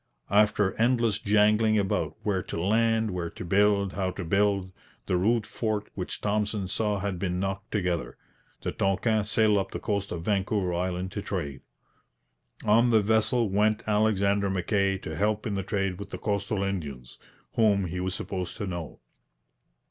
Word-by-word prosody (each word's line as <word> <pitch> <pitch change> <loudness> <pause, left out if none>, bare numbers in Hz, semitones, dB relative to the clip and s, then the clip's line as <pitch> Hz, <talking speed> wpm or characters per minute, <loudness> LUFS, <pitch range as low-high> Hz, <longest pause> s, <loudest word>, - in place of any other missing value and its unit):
After 105 -1 +3
endless 115 -3 +2
jangling 105 +1 +3
about 100 -2 0
where 95 -3 0
to - - -5
land, 110 +3 +2
where 90 -2 -3
to - - -8
build, 100 +1 +3
how 95 -1 -1
to 95 +1 -5
build, 100 +1 +1 0.3
the 90 - 0
rude 110 +4 +2
fort 105 -2 -3
which 90 - -5
Thompson 105 -1 -1
saw 105 +2 0
had 95 -2 -3
been 90 -1 -1
knocked 95 +2 -3
together. 90 -5 -1 0.5
The - - -1
Tonquin 105 +2 +1
sailed 105 0 +3
up 95 - -3
the - - -5
coast 100 -2 -2
of 85 -1 -4
Vancouver 100 -2 0
Island 90 +1 -2
to 105 - -4
trade. 75 -10 -4 1.0
On 115 +3 +5
the 110 -3 +4
vessel 110 +2 +2
went 105 +2 +2
Alexander 100 -2 +2
Mackay 95 +1 +1
to - - -6
help 105 +1 0
in 105 - -2
the 100 - -1
trade 95 -1 -2
with 100 -1 -7
the - - -5
coastal 100 0 -1
Indians, 75 -11 -5 0.3
whom 100 -4 +3
he 90 +1 -4
was 90 0 -2
supposed 95 -2 -4
to 105 - -3
know. 85 -5 -6
100 Hz, 165 wpm, -27 LUFS, 95-105 Hz, 1.0 s, On